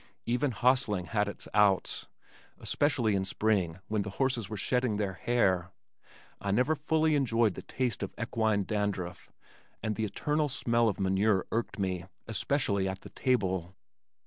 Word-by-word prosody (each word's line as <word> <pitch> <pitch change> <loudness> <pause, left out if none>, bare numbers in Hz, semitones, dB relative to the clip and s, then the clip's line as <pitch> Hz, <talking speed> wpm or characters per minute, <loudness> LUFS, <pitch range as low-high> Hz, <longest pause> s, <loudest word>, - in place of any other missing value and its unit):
Even 125 +5 +1
hostling 120 -6 +2
had 105 0 0
its 100 - -6
"outs," 105 -3 +2 0.5
especially 130 -7 +1
in 95 -1 +1
spring 95 -4 0
when 105 -1 0
the 100 - -4
horses 125 -6 0
were 110 - -4
shedding 125 +1 +1
their 100 -2 -1
hair. 95 -5 +1 0.7
I 100 - -4
never 125 +10 +3
fully 155 +1 +2
enjoyed 115 -7 +2
the - - -7
taste 125 -3 -2
of - - -3
equine 110 -3 +1
dandruff, 100 -4 -3 0.5
and 110 -1 -1
the 110 - -1
eternal 150 +8 0
smell 115 -3 +2
of 100 - -4
manure 95 +1 +2
irked 115 +1 -2
me, 95 -3 -2 0.2
especially 110 -3 +1
at 95 0 -5
the - - -11
table. 95 -8 0
110 Hz, 150 wpm, -30 LUFS, 95-125 Hz, 0.7 s, never